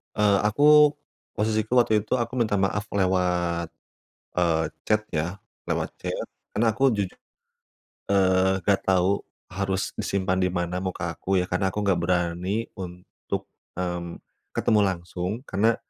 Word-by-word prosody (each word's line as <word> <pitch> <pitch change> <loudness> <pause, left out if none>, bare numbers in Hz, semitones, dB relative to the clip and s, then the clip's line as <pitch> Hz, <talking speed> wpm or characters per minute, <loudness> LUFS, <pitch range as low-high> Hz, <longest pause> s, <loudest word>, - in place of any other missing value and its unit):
Eee, 105 -2 +4
aku, 150 +5 +6 0.4
posisiku 110 +2 0
waktu 110 -2 +1
itu, - - -2
aku 120 -1 -1
minta 115 -3 +1
maaf 100 +1 +1
lewat, 90 -3 +1 0.6
eee, 85 -2 +2 0.2
chat 105 0 +2
ya, 85 +3 -1 0.3
lewat - - -1
chat. - - -3 0.3
Karena 110 +1 +3
aku 135 +5 +3
juju 100 -3 -1 1.0
eee, 95 -1 +3
gak 100 -1 +3
tahu 95 +1 +3 0.3
harus 95 0 -1
disimpan 95 -1 0
di 90 - +3
mana 90 0 -2
muka 90 -2 -3
aku 95 +4 -2
ya, 90 - 0
karena 90 +2 +1
aku 105 +2 -2
nggak 95 -4 +2
berani 90 +4 0
untuk, 90 -1 -6 0.3
mmm, 90 -1 -4 0.3
ketemu 110 - +3
langsung. 90 0 -3
Karena, 110 -1 +2
95 Hz, 135 wpm, -25 LUFS, 90-105 Hz, 1.0 s, aku